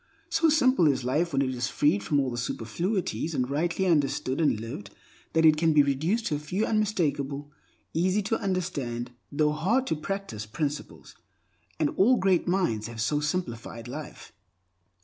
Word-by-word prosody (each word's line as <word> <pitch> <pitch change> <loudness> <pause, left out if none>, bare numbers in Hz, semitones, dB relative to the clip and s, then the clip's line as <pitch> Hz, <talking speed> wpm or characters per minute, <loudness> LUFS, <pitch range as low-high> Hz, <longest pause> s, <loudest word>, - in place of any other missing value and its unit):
So 325 - +3
simple 255 - +4
is 135 -3 +1
life 155 +7 0
when 140 -1 +2
it 130 -1 -1
is 120 0 -1
freed 165 +8 +2
from 145 - +1
all 130 -3 -1
superfluities 165 - -2
and 125 -2 0
rightly 165 +7 0
understood 140 -4 +1
and 145 -9 +2
lived 110 -3 -7 0.4
that 160 0 +4
it 155 -1 +6
can 160 0 +3
be 150 -1 +6
reduced 160 - 0
to 150 - 0
a - - -6
few 180 +8 -1
unmistakable, 145 -10 -1 0.4
easy 185 +5 +1
tounderstand, 180 - -2 0.2
though 150 +1 +2
hard 195 +13 +1
to 160 - 0
practice 150 - -5
principles. 145 +5 -4 0.7
And 150 - +2
all 245 +7 +5
great 190 -4 +2
minds 175 - 0
have 115 -1 -8
so 145 +7 +1
simplified 125 -7 -3
life. 145 +5 -8
150 Hz, 160 wpm, -27 LUFS, 135-185 Hz, 0.7 s, it